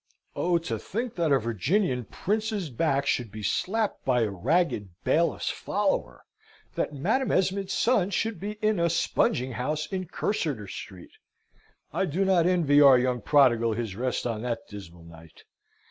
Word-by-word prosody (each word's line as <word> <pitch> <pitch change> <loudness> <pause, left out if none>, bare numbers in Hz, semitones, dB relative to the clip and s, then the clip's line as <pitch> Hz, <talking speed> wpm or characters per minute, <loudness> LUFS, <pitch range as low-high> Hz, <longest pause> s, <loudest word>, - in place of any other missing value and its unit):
Oh, 175 0 +1
to 165 - -4
think 230 +3 -4
that 165 -4 0
a 140 - +6
Virginian 125 - 0
prince's 210 - -2
back 140 +1 0
should 120 -5 -1
be 110 -1 -8
slapped 215 - -1
by 125 -2 +2
a 110 -3 0
ragged 105 - 0
bailiffs - - +1
follower! - - -2 0.5
that - - -2
Madam 215 - 0
Esmond's 195 +1 0
son 215 -6 +2
should 215 0 -2
be 205 +3 -4
in 215 -3 +2
a 170 0 +2
spunging 130 -5 +1
house 150 +6 -2
in 185 0 -4
Cursitor 150 - -2
Street! 95 -1 -9 0.8
I - - +1
do 185 +7 0
not 180 -3 +3
envy 160 -6 +4
our 135 -3 +8
young 125 -1 0
prodigal 120 -4 +4
his 110 -3 -4
rest 125 +3 -2
on 115 -3 -2
that 115 -1 -4
dismal 85 -5 -11
night. 80 -1 -15
145 Hz, 160 wpm, -27 LUFS, 115-185 Hz, 0.8 s, our